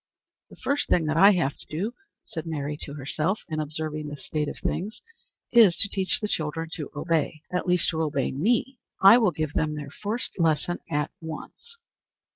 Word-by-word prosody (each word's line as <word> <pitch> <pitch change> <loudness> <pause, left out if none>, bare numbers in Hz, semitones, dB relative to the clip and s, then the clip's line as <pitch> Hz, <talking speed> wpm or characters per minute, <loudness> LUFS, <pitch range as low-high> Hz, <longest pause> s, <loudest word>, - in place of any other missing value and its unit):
"The - - -13
first 285 +1 -1
thing 165 - +3
that 155 0 0
I 200 +4 +8
have 160 -7 0
to - - -15
do," 195 +10 -3 0.3
said 160 -1 -6
Mary 150 -2 -3
to 145 - -8
herself, 155 +7 -1
in 155 -2 -3
observing 155 0 -3
this 145 -2 -8
state 150 -1 -1
of - - -7
things, 205 +5 -3 0.5
"is 220 -8 +7
to 200 - +3
teach 190 -1 0
the 210 - -2
children 160 -2 -2
to 150 - -5
obey 155 0 -1
at 180 - -1
least 180 -1 +3
to 160 -1 -1
obey 145 -4 0
me. 235 - 0 0.2
I 200 +5 +9
will 220 -5 +4
give 155 -2 -3
them 155 -1 0
their 145 -2 -6
first 215 +3 -4
lesson 165 +1 +2
at 150 0 -1
once." 315 - -9
160 Hz, 190 wpm, -26 LUFS, 150-195 Hz, 0.5 s, I